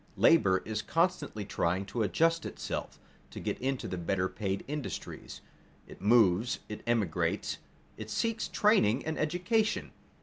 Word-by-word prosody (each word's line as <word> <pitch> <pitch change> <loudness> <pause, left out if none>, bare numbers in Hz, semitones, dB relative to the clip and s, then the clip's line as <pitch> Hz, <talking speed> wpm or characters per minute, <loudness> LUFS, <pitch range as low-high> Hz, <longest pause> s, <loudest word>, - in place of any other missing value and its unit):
Labor 95 - +5
is 110 0 -2
constantly 150 - 0
trying 95 0 0
to 110 +4 -3
adjust 165 - +2
itself, - - -5 0.3
to - - -8
get - - -3
into 135 0 -1
the 90 - -4
better 90 +2 0
paid 95 -1 -3
industries. 150 -1 -6 0.4
It - - -13
moves, 110 0 +4
it 105 - -7
emigrates, 110 -8 0 0.4
it 110 0 -7
seeks 225 - -1
training 140 - +3
and 160 0 -2
education. 180 +8 0
115 Hz, 135 wpm, -31 LUFS, 100-165 Hz, 0.4 s, Labor